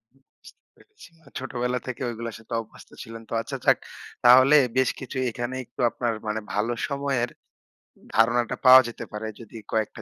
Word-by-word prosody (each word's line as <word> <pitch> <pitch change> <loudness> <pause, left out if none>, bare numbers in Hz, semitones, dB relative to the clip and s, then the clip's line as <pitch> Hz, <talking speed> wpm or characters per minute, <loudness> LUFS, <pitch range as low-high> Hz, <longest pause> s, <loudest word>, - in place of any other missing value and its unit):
বুঝতে 135 - -21
পেরেছি। 425 - -18
না, 165 - -27
ছোটবেলা 125 -1 -2
থেকে 130 +1 -5
ওইগুলোর 115 -1 -6
সাথে 110 +1 -10
অভ্যস্ত 110 - -16
ছিলেন 115 0 -10
তো? - - -6
আচ্ছা - - -6
যাক। - - +5 0.5
তাহলে 130 +4 +8 0.2
বেশ 130 - +3
কিছু 130 0 -7
এখানে 120 +2 -4
একটু 120 - -8
আপনার 120 -2 -2
মানে 105 +1 -1
ভালো 110 +4 0
সময়ের 140 -4 -1 0.9
ধারণাটা 120 +1 +3
পাওয়া 130 +1 +10
যেতে 120 - -7
পারে 105 +1 -5
যদি 115 0 -11
কয়েকটা 110 -1 -2
120 Hz, 160 wpm, -25 LUFS, 115-130 Hz, 0.9 s, পাওয়া